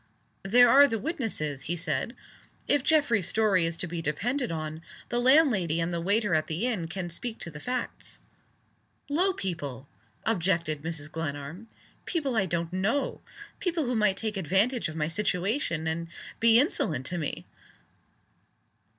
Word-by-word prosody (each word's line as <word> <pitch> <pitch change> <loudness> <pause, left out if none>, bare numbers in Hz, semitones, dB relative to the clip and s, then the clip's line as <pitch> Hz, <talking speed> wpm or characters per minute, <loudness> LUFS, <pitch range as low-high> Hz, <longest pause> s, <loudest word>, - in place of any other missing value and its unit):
"There 245 +6 +6
are 280 +4 +8
the 225 - -1
witnesses," 215 - -3
he 175 - +1
said. 165 - -2 0.5
"If 290 - +3
Geoffrey's 280 - +3
story 195 -6 +3
is 165 0 -3
to - - -3
be 170 -1 -4
depended 225 - -1
on, 155 -1 -4 0.3
the 240 - 0
landlady 240 - +4
and 165 +1 -1
the 170 - -1
waiter 205 +2 +1
at 155 -1 +2
the 165 +8 -2
inn 210 -10 -1
can 175 0 -5
speak 225 +6 -4
to 170 - -4
the 150 - -9
facts." 250 +7 -4 0.9
"Low 360 +6 +3
people!" 145 - -4 0.4
objected 170 -7 0
Mrs. 155 -2 -5
Glenarm. 160 +5 -5 0.4
"People 285 -8 -1
I 195 -4 +2
don't 170 0 -2
know. 215 +10 0 0.4
People 335 -5 -1
who 250 - -1
might 210 -3 +2
take 215 -2 -2
advantage 195 - +1
of 155 - -8
my 150 -1 0
situation, 180 - -1
and 165 +1 -2 0.3
be 230 0 +7
insolent 180 - +1
to 175 +5 -2
me." 150 - -4
185 Hz, 155 wpm, -28 LUFS, 160-240 Hz, 0.9 s, are